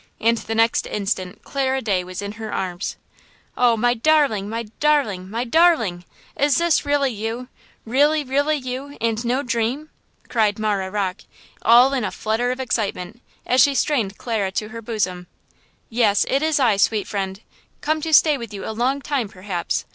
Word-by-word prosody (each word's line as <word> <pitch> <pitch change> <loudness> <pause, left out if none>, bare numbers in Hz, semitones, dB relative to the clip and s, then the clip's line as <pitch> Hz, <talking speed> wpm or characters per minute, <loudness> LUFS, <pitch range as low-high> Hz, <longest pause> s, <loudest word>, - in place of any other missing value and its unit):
And 230 +1 +2
the 225 0 -4
next 225 +1 +2
instant 195 -3 -3
Clara 265 -1 -1
Day 200 -7 0
was 185 +2 -6
in 200 - -4
her 220 0 -7
arms. 180 0 -3 0.6
"Oh, 240 -2 +3
my 240 +2 +2
darling! 245 -6 +2
my 230 +1 -3 0.2
darling! 265 -12 +1
my 230 +4 -2
darling! 240 - +2 0.3
is 285 -1 +2
this 340 -2 +2
really 285 -2 +2
you? 225 +3 -5 0.4
Really, 290 +6 +3
really 285 +3 +1
you, 265 +2 -6
and 230 0 -1
no 250 +4 0
dream?" 245 +5 -2 0.4
cried 215 -4 +1
Marah 205 -3 -1
Rocke, 195 -1 -2 0.4
all 245 +4 +6
in 260 -4 0
a - - -1
flutter 225 +3 -1
of 255 +1 -3
excitement, 220 -3 -3 0.2
as 255 +1 +4
she 280 -1 +4
strained 230 -10 0
Clara 215 -5 -2
to 215 +2 -2
her 230 +1 -8
bosom. 190 -6 -3 0.6
"Yes, 220 -4 +2
it 275 - +1
is 315 -1 +1
I, 230 -7 +3
sweet 210 +1 +2
friend, 195 -1 -3 0.4
come 310 +1 0
to 320 - -3
stay 300 -2 +5
with 230 -3 -7
you 195 - -6
a 220 - -3
long 255 +5 0
time, 265 -8 -1
perhaps." 185 -2 -3
230 Hz, 175 wpm, -22 LUFS, 205-270 Hz, 0.6 s, all